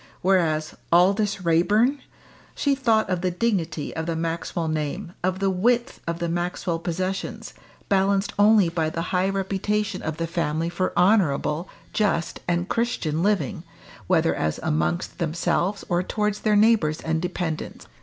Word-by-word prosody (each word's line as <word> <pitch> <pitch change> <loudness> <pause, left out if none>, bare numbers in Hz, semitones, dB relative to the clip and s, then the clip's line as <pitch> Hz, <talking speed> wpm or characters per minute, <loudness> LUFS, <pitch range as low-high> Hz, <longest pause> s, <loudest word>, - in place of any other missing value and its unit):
Whereas 165 -5 +2 0.2
Aldous 195 +2 +3
Raeburn! 210 - +3 0.6
she 285 - +1
thought 230 -5 +2
of 180 -2 -1
the 185 - +1
dignity 175 -6 -1
of 160 0 -3
the 165 - -1
Maxwell 165 0 -2
name, 155 +2 -3
of 185 +1 0
the 195 0 +1
width 235 +6 +1
of 170 0 -1
the 170 0 -2
Maxwell 175 0 -2
possessions, 185 +3 -4 0.3
balanced 195 0 +2
only 205 -2 +6
by 165 -2 -1
the 165 +1 -3
high 185 +1 +2
reputation 195 +1 -1
of 160 -1 -4
the 165 - -1
family 165 -1 -1
for 180 +2 -1
honourable, 175 -4 +2 0.2
just 200 -6 0
and 175 0 0
Christian 195 -11 -1
living, 200 -2 0 0.5
whether 165 -3 +3
as 75 0 -2
amongst 80 - -1
themselves 175 +4 -1
or 175 -1 +1
towards 210 +2 -1
their 215 -1 +2
neighbours 205 -8 +3
and 160 0 -1
dependents. 175 -3 -4
180 Hz, 145 wpm, -24 LUFS, 165-200 Hz, 0.6 s, only